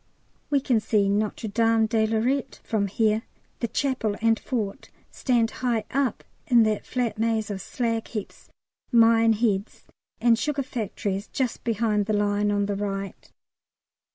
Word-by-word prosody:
We 285 - +3
can 255 -4 +2
see 210 -1 +1
Notre 210 +2 -1
Dame 225 +1 +3
de 220 0 +1
Lorette 250 +5 -1
from 205 -3 0
here; 215 +2 +1 0.4
the 235 - -1
Chapel 250 -4 -1
and 225 0 +2
Fort 215 -6 -4 0.2
stand 235 -3 +1
high 240 -3 +1
up 275 -2 0 0.2
in 240 -5 +6
that 215 -1 -1
flat 235 -4 -2
maze 225 -2 0
of 195 -1 -4
slag 230 +1 -2
heaps, 210 -4 -7 0.4
mine 230 -1 +5
heads, 210 -2 -1 0.4
and 230 -1 +4
sugar 290 +1 -1
factories 205 -5 -3
just 255 -4 -2
behind 215 -2 0
the 215 - 0
line 205 0 +1
on 205 0 +1
the 200 0 -2
right. 195 -1 -5
225 Hz, 150 wpm, -25 LUFS, 205-235 Hz, 0.4 s, in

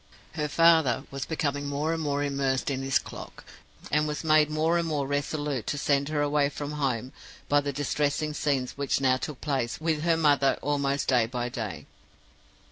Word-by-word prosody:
Her 150 -2 -2
father 160 -5 +4
was 140 0 -4
becoming 145 -3 -2
more 145 +3 -1
and 165 - -2
more 145 -1 0
immersed 140 -1 0
in 135 -1 -2
his 135 -1 +2
clock, - - -9 0.5
and 150 +1 +2
was 150 +1 -3
made 155 -1 +4
more 160 +3 +1
and 170 - -1
more 150 -3 -1
resolute 145 -3 -2
to 145 - -1
send 140 0 +1
her 150 -1 0
away 145 -1 +2
from 145 0 -5
home 130 -4 -2 0.3
by 145 0 +3
the 145 0 -2
distressing 145 +2 -1
scenes 135 -4 0
which 140 -1 0
now 130 -1 +3
took 140 0 -6
place 135 -6 -1
with 160 -1 0
her 165 0 +2
mother 145 -4 +3
almost 140 -1 0
day 125 -4 +3
by 120 0 -3
day. 115 -5 -5
145 Hz, 185 wpm, -27 LUFS, 135-150 Hz, 0.5 s, father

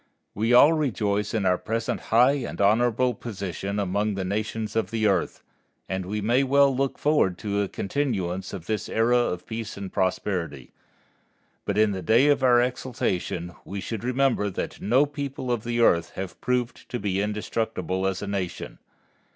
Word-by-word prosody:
We 110 +4 0
all 145 +6 +7
rejoice 105 -9 0
in 110 -4 -1
our 90 -1 +3
present 115 0 -2
high 125 +5 +4
and - - -6
honorable 120 +4 +3
position 100 -3 -5
among 100 +1 0
the 95 -1 -3
nations 110 +3 -3
of 115 - 0
the 110 -1 -1
earth, 95 -4 0 0.4
and 95 0 -3
we 105 +2 -2
may 120 +6 +3
well 140 0 +4
look 135 +1 -1
forward 145 - +2
to 100 -1 -1
a 100 - 0
continuance 95 -7 -2
of 90 -4 -7
this 110 +1 -2
era 115 +2 +2
of 90 -7 -1
peace 110 -2 -6
and 100 -1 -7
prosperity. 90 -7 -2 0.9
But 100 - -1
in 110 -1 +4
the 95 -1 -3
day 115 - +4
of 145 - +3
our 125 -2 +5
exaltation 105 -8 -2
we 100 - -6
should 110 +4 -5
remember 125 -4 +1
that 95 - -5
no 125 +7 +4
people 140 -3 -4
of 120 -3 -1
the 120 0 -1
earth 85 -7 +3
have 95 -1 -6
proved 125 -1 -2
to 125 - -2
be 100 -2 -1
indestructible 105 -2 -2
as 95 +1 -2
a - - -4
nation. 95 -4 -4
110 Hz, 175 wpm, -25 LUFS, 95-120 Hz, 0.9 s, all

